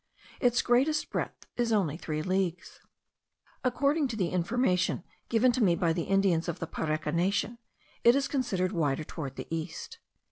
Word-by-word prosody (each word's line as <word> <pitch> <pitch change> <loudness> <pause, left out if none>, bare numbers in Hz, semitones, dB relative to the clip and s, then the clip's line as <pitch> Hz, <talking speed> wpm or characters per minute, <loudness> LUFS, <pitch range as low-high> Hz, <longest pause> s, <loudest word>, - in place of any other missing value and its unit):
Its 245 -1 +3
greatest 265 +6 +2
breadth - - -3
is 240 -1 +1
only 190 -9 +2
three 155 -2 -3
leagues. 185 -1 -2 0.8
According 280 +4 +2
to 220 -6 -1
information 180 0 +1 0.3
given 235 +2 +4
me 175 -4 +4
by 170 -1 +1
the 170 -1 -2
Indians 195 -4 +2
of 170 - -3
the - - -4
Pareka 155 -1 -2
nation, 200 +7 0 0.4
it 235 +2 +7
is 275 0 +1
considerably 190 - -1
wider 145 0 +1
toward 150 -3 -6
the - - -6
east. 165 - -5
185 Hz, 150 wpm, -29 LUFS, 165-240 Hz, 0.8 s, it